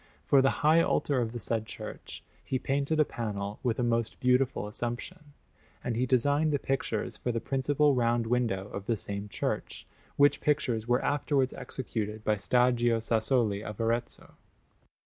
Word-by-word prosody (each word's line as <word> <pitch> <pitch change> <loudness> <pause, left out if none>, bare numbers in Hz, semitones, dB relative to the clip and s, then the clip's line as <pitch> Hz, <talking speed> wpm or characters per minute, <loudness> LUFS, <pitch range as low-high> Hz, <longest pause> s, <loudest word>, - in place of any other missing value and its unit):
For 140 - +5
the 135 +2 0
high 160 +2 +6
altar 140 -5 +1
of 115 -2 -2
the 120 - -5
said 110 -1 -2
church - - -8 0.2
he 130 - -1
painted 140 +4 -1
a 155 - +5
panel 105 -4 -4
with 120 -3 0
a 125 - 0
most 115 -1 0
beautiful 125 -2 +2
Assumption, 120 - -5 0.5
and 120 -2 -2
he 125 +3 0
designed 145 +5 +2
the 145 - +2
pictures 135 -5 -2
for 125 - -2
the 115 - -1
principal 140 +3 +2
round 120 -2 +1
window 115 -5 0
of 100 0 -7
the 115 - +1
same 100 +1 -5
church; - - -3 0.3
which 145 0 +4
pictures 120 -7 0
were 120 +1 +2
afterwards 140 -2 +1
executed 110 -4 -5
by 110 - +2
Stagio 120 +1 +2
Sassoli 110 -2 +1
of 105 -2 -7
Arezzo. 115 +1 -2
120 Hz, 160 wpm, -29 LUFS, 115-135 Hz, 0.5 s, high